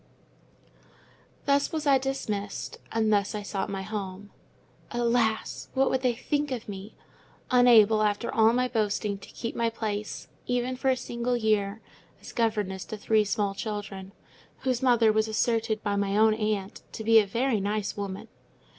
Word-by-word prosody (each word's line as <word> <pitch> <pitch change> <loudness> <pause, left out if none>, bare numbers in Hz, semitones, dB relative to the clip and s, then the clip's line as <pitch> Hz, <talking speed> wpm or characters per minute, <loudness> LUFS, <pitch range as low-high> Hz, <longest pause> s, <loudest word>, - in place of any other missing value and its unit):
Thus 280 0 +2
was 315 -1 -3
I 275 -2 +5
dismissed, 215 -7 -4
and 220 -1 +2
thus 200 0 +1
I 210 - -4
sought 200 -1 -3
my 195 -1 -3
home. 200 -1 -6 0.6
Alas! 235 -2 0
what 265 0 +3
would 260 - +1
they 250 -2 +1
think 290 +4 -1
of 250 -4 -4
me? 200 +1 -8 0.6
unable, 225 -4 +6
after 210 +2 0
all 220 0 +5
my 250 +1 +1
boasting, 210 -3 -1
to - - -13
keep 230 - -5
my 230 0 +1
place, 215 -2 -4 0.2
even 245 +1 0
for 265 +1 0
a 260 - +3
single 240 0 -2
year, 215 -2 0 0.4
as - - -11
governess 210 -5 -1
to 215 - -6
three 215 +1 +2
small 205 -1 -1
children, 200 -2 -5 0.5
whose 255 -2 0
mother 235 -4 +4
was 220 0 +1
asserted 220 0 0
by 205 -1 0
my 200 0 0
own 220 0 +5
aunt 210 -3 -2
to 220 - -5
be 225 0 +7
a 210 - +1
"very 235 +2 +1
nice 205 +1 -2
woman." 200 -1 -5
220 Hz, 165 wpm, -27 LUFS, 205-240 Hz, 0.6 s, be